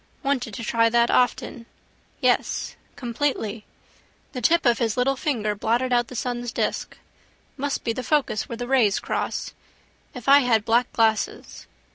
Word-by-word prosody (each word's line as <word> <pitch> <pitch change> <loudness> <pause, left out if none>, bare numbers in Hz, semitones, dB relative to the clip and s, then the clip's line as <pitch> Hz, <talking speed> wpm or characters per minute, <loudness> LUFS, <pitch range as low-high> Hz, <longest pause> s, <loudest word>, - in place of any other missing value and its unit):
Wanted 255 -6 -1
to 230 - -6
try 230 0 +2
that 235 +1 +3
often. 245 -1 0 0.5
Yes: - - 0 0.2
completely. 235 -4 -2 0.7
The 250 - -4
tip 335 +7 +3
of 240 -2 +3
his 225 -2 0
little 265 +2 +2
finger 235 -7 -1
blotted 235 +5 0
out 240 -1 +2
the 255 - -10
sun's 245 0 -3
disk. - - -3 0.6
Must 285 0 -3
be 230 - -1
the 255 - -4
focus 280 -6 0
where 235 - -5
the 245 +1 -5
rays 240 -7 +3
cross. - - -3 0.6
If 250 0 -9
I 280 +1 +8
had 230 -5 +2
black 235 +2 +2
glasses. 220 -1 -1
240 Hz, 155 wpm, -24 LUFS, 225-255 Hz, 0.7 s, I